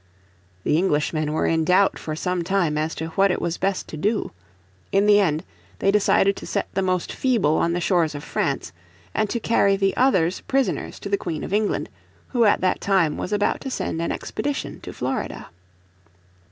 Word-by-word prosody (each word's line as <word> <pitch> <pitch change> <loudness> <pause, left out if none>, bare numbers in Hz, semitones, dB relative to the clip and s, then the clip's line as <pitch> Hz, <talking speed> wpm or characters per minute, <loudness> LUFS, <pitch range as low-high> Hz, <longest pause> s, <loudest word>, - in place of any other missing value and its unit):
The 150 - +2
Englishmen 155 -3 0
were 155 - 0
in 160 -1 +2
doubt 185 +4 +3
for 155 - -4
some 180 +2 -1
time 175 -4 +1
as 155 +2 -1
to 160 +1 -4
what 195 +4 +3
it 180 - 0
was 170 0 -2
best 195 0 -1
to 155 - -6
do. 210 +7 0 0.6
In 195 +1 +3
the 205 0 +6
end 160 -5 +1 0.3
they 195 - +2
decided 200 -1 +3
to - - -8
set - - -1
the 195 - 0
most 185 -2 -1
feeble 225 - +2
on 170 - +1
the 175 - 0
shores 170 -4 +1
of 145 - -6
France, - - -2 0.4
and 215 -1 0
to 235 - -1
carry 200 -3 +3
the 195 0 +1
others 185 -10 +2
prisoners 270 -2 0
to - - -5
the 200 - +2
Queen 165 -3 -4
of - - -5
England, 210 0 0 0.4
who 240 -3 +3
at 205 - +3
that 185 - +1
time 185 -6 +2
was 180 - -4
about 205 0 +1
to 270 - -4
send 165 -9 -3
an 170 - -1
expedition 290 -1 -4
to - - -7
Florida. - - -4
185 Hz, 195 wpm, -23 LUFS, 160-205 Hz, 0.6 s, the